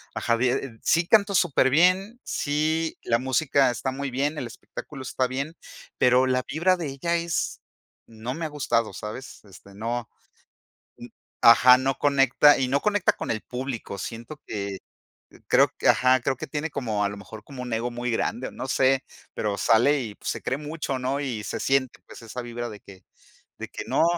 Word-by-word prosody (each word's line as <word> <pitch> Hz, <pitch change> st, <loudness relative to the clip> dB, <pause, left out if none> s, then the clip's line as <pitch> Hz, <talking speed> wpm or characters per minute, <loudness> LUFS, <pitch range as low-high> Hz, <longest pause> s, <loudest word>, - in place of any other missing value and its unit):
ajá 115 Hz, -, +1 dB
de, 125 Hz, 0 st, -1 dB
sí 165 Hz, +1 st, +2 dB
canto 200 Hz, -1 st, +4 dB
superbién, 180 Hz, -, +3 dB
sí, 155 Hz, +2 st, -1 dB
la 115 Hz, 0 st, +1 dB
música 130 Hz, +1 st, +2 dB
está 130 Hz, +2 st, -3 dB
muy 140 Hz, 0 st, -4 dB
bien, 145 Hz, +4 st, -1 dB
el 125 Hz, -, -3 dB
espectáculo 135 Hz, +3 st, -9 dB
está 130 Hz, 0 st, -1 dB
bien, 140 Hz, +6 st, -4 dB, 0.4 s
pero 125 Hz, +1 st, +4 dB
la 125 Hz, 0 st, +1 dB
vibra 170 Hz, +6 st, +2 dB
de 165 Hz, -4 st, -4 dB
ella 140 Hz, +6 st, -2 dB
es, 170 Hz, -1 st, -2 dB, 0.5 s
no 115 Hz, +2 st, -6 dB
me 165 Hz, +4 st, -6 dB
ha 155 Hz, -, -3 dB
gustado, 115 Hz, -7 st, 0 dB
¿sabes? 105 Hz, +7 st, -8 dB
Este 100 Hz, 0 st, -16 dB
no, 115 Hz, +3 st, -4 dB, 1.3 s
ajá, 125 Hz, +2 st, +8 dB
no 135 Hz, +1 st, 0 dB
conecta 140 Hz, +1 st, +5 dB
y 130 Hz, -, 0 dB
no 140 Hz, +2 st, +1 dB
conecta 205 Hz, -2 st, +2 dB
con -, -, -5 dB
el 110 Hz, -1 st, -2 dB
público 125 Hz, -5 st, -5 dB
siento 120 Hz, -, -7 dB
que, 100 Hz, -2 st, -4 dB, 0.7 s
creo -, -, +5 dB
que -, -, +3 dB
ajá, 130 Hz, 0 st, +4 dB
creo 130 Hz, +1 st, -1 dB
que -, -, -5 dB
tiene 150 Hz, +1 st, -3 dB
como 110 Hz, -7 st, -2 dB
a -, -, 0 dB
lo 100 Hz, -, -7 dB
mejor 105 Hz, +1 st, -11 dB
como 130 Hz, -3 st, -8 dB
un 125 Hz, -2 st, -4 dB
ego 115 Hz, +2 st, -1 dB
muy 120 Hz, 0 st, -3 dB
grande 120 Hz, +2 st, -1 dB
o -, -, -15 dB
no -, -, -6 dB
sé, 130 Hz, 0 st, +2 dB, 0.3 s
pero 105 Hz, -1 st, -2 dB
sale 130 Hz, +8 st, +3 dB
y 110 Hz, -4 st, -6 dB
pues -, -, -6 dB
se -, -, -5 dB
cree 130 Hz, -, -1 dB
mucho 150 Hz, -3 st, -4 dB
¿no? 130 Hz, +2 st, -1 dB
Y 120 Hz, -7 st, -3 dB
se -, -, -4 dB
siente 135 Hz, -2 st, 0 dB
pues -, -, -12 dB
esa 120 Hz, +3 st, -6 dB
vibra 120 Hz, 0 st, -5 dB
de 105 Hz, -2 st, -10 dB
que 95 Hz, -1 st, -15 dB, 0.6 s
de -, -, -5 dB
que -, -, -6 dB
no. -, -, +2 dB
130 Hz, 190 wpm, -25 LUFS, 115-145 Hz, 1.3 s, ajá